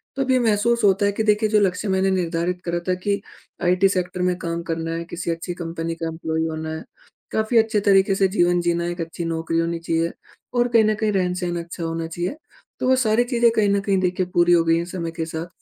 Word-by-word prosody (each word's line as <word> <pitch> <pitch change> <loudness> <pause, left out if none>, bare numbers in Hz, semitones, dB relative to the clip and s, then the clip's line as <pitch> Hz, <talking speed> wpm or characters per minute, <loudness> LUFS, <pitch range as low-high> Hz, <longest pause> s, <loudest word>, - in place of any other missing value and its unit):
तो 270 - -1
अब 260 - -1
ये 255 - +4
महसूस 235 +1 +2
होता 200 0 +4
है 200 - +3
कि 210 +2 -2
देखिए 215 0 +2
जो 210 0 +4
लक्ष्य 195 +1 0
मैंने 190 0 +2
निर्धारित 180 0 -1
करा 175 0 -1
था 185 - +3
कि 200 -1 +1 0.4
आईटी 180 +2 +4
सेक्टर 180 -1 -2
में 180 0 +1
काम 170 -1 -3
करना 165 0 -2
है, 165 0 -3
किसी 170 0 -4
अच्छी 165 +2 -4
कंपनी 165 -1 -4
का 165 0 -4
एम्प्लॉयी 160 0 -2
होना 160 0 -4
है, 160 - -7 0.5
काफ़ी 220 +2 +1
अच्छे 220 -1 +3
तरीके 195 0 +4
से 195 0 +3
जीवन 175 0 +3
जीना 170 0 0
है, 175 - -2
एक 175 0 -5
अच्छी 165 +1 -5
नौकरी 165 0 -1
होनी 165 0 -1
चाहिए 165 0 -1 0.4
और 245 0 +2
कहीं 230 -2 +4
न 215 0 +2
कहीं 215 0 0
रहन-सहन 180 -2 -1
अच्छा 170 0 -7
होना 165 0 -3
चाहिए 175 - -3 0.4
तो - - -1
वो 260 - +6
सारी 235 -2 +2
चीज़ें 240 -1 +3
कहीं 215 -2 +2
न 200 0 +2
कहीं 195 -1 +1
देखिए 185 0 0
पूरी 175 0 +4
हो 170 -1 +5
गई 165 0 +3
हैं 170 - -2
समय 170 -2 -4
के 165 0 -4
साथ। 160 +1 -5
180 Hz, 240 wpm, -22 LUFS, 165-205 Hz, 0.5 s, वो